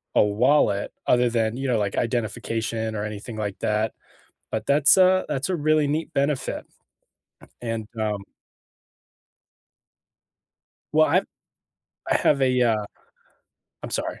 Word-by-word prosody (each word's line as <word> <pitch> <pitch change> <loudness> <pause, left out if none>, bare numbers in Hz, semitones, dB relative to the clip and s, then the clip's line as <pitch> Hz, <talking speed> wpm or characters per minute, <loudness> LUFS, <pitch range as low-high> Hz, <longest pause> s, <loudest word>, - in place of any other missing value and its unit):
a - - +6
wallet, 105 -1 +2
other 125 0 +4
than, 115 0 0
you 135 0 -3
know, 120 - +2
like, 100 -2 -1
identification 115 -1 -2
or 105 - -2
anything, 110 +2 -7
like, 105 -2 -3
that. 110 +1 0 0.6
But 110 -1 -3
that's 140 0 +5
a 185 0 +5
that's 140 +5 -2
a 185 - +1
really 155 -1 +2
neat 155 +3 -2
benefit. 140 0 -1 1.0
And, 115 -2 -3
um 105 -2 -2 2.7
Well, - - +5
I've - - +3 0.9
I - - +3
have 140 -2 +3
a, 130 -1 +3
uh 110 -3 +2 1.0
I'm - - -6
sorry, - - -3
115 Hz, 125 wpm, -24 LUFS, 110-140 Hz, 2.7 s, a